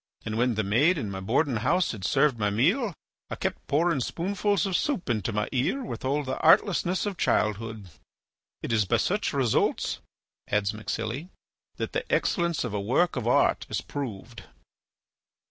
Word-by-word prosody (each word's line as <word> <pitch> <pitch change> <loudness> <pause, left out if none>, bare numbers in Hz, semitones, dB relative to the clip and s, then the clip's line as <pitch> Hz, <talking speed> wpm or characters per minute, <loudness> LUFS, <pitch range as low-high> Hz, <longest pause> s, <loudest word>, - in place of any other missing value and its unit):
And 110 - -3
when 120 +1 +1
the 110 - 0
maid 135 - +3
in 110 -8 -3
my 95 - -5
boarding 120 +6 +1
house 165 - +1
had 105 -5 -8
served 135 +3 +2
my 105 -1 +1
meal 175 - +1 0.3
I - - -3
kept - - -4
pouring 160 +1 +2
spoonfuls 200 - 0
of 190 -2 -1
soup 225 - 0
into 110 0 -1
my 105 0 -1
ear 135 - 0
with - - -6
all 140 +3 0
the 130 -1 -4
artlessness 180 +3 +3
of 200 -3 -3
childhood." 105 -1 0 0.8
"It - - -2
is 105 -2 +3
by - - +2
such 205 +3 0
results," 130 -6 +1 0.5
adds 105 0 0
MacSilly, 115 - -4 0.5
"that - - -4
the - - -3
excellence 170 -3 +1
of 120 -4 -4
a 105 - -1
work 130 - +1
of 120 -3 -3
art 120 - +2
is - - -2
proved." 120 -4 -6
130 Hz, 170 wpm, -27 LUFS, 110-170 Hz, 0.8 s, maid